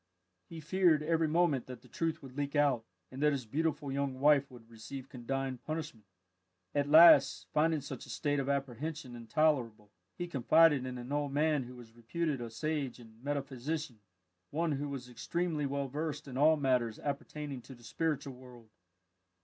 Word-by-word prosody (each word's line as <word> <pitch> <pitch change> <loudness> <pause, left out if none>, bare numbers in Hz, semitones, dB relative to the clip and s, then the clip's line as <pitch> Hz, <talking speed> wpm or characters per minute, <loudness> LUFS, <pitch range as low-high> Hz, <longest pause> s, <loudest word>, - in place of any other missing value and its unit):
He 165 - -8
feared 170 -1 +3
every 165 0 +2
moment 155 -5 +2
that 125 -2 -9
the - - -16
truth 165 -3 -2
would 130 -1 -11
leak 145 0 -3
out, 140 -6 +3 0.3
and 130 +2 -7
that 150 0 +4
his 135 -4 -3
beautiful 150 +3 -1
young 135 -1 -2
wife 140 -1 +4
would 120 -3 -14
receive 125 +4 -9
condign 130 0 -3
punishment. 150 -10 -6 0.7
At 145 0 0
last, 150 -3 +7
finding 155 0 +2
such 140 - -8
a - - -14
state 145 -2 -1
of 135 0 -2
apprehension 140 0 -3
intolerable, 115 -4 0 0.3
he 175 - -3
confided 150 -2 +4
in 125 0 -5
an 125 +2 -8
old 145 -1 -1
man 150 -2 +2
who 125 +1 -10
was 120 -2 -13
reputed 135 +4 -2
a 120 - -5
sage 140 +2 -3
and 115 0 -16
metaphysician 140 -1 -3 0.5
one 165 +2 0
who 145 0 -2
was 135 -3 -6
extremely 155 +4 -2
well 140 0 -2
versed 150 +2 -4
in 130 - -8
all 155 +4 +5
matters 125 -5 +1
appertaining 145 -1 -5
to 130 - -12
the 120 - -19
spiritual 145 +2 -2
world. 125 -3 -15
140 Hz, 175 wpm, -32 LUFS, 125-155 Hz, 0.7 s, last